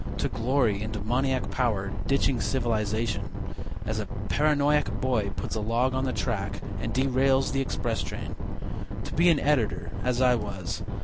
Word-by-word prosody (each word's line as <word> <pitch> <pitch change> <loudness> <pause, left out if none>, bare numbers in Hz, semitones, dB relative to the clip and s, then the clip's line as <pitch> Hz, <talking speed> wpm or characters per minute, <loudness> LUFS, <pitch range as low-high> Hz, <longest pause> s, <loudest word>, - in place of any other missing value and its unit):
To - - +1
glory 115 -4 +1
in 110 - -3
demoniac 125 +5 0
power, 105 -6 0 0.2
ditching 135 -3 +2
civilization, 110 -4 0 0.6
As 110 0 -1
a 105 - -3 0.2
paranoiac 150 +4 +3
boy 120 -6 +1
puts - - -4
a 110 - -1
log 120 +4 +1
on 130 +1 0
the 130 - 0
track 105 -6 -2 0.2
And 115 - -2
derails 130 +1 +3
the 135 - +1
express 135 - -1
train. - - -5 0.7
To - - -6
be 170 +3 +5
an 160 -4 +5
editor, 140 -7 +1
as 125 -1 +1
I 125 -1 +5
was. 100 -6 -3
125 Hz, 160 wpm, -28 LUFS, 110-135 Hz, 0.7 s, be